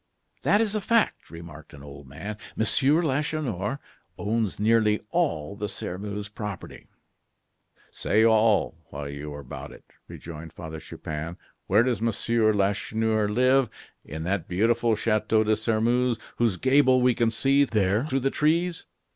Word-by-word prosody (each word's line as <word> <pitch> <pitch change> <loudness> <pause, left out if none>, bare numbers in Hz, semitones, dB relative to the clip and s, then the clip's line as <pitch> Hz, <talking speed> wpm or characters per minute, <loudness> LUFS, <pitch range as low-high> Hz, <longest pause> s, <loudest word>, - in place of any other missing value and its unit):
"That 205 - +3
is 215 -2 +1
a 215 - -1
fact," 230 +1 +1
remarked 85 -2 -11
an 70 - -13
old 70 -1 -11
man; 100 +11 -7 0.2
"Monsieur 140 +9 +2
Lacheneur 140 - -1 0.4
owns 110 -2 -1
nearly 105 0 +3
all 100 - -1
the 105 0 -4
Sairmeuse 100 +4 -5
property." 105 -3 -8 1.0
"Say 110 +2 +2
all, 110 -4 +3 0.2
while 70 0 -6
you 70 +1 -7
are 70 0 -7
about 65 - -8
it," - - -15 0.2
rejoined 80 0 -9
Father 80 -1 -7
Chupin. 80 +2 -6 0.3
"Where 105 +4 +4
does 120 -4 -1
Monsieur 115 0 +1
Lacheneur 105 +2 0
live? 130 +2 +3 0.3
In 80 0 -7
that 90 0 -2
beautiful 115 +5 +2
Chateau 110 0 +1
de 110 0 +2
Sairmeuse 115 +2 +1 0.2
whose 115 -6 +1
gable 130 +1 +4
we 125 0 +4
can 115 0 +1
see 135 +5 +3
there 110 0 +1
through 135 -2 0
the 135 +2 +1
trees. 170 +3 0
110 Hz, 145 wpm, -26 LUFS, 95-125 Hz, 1.0 s, Where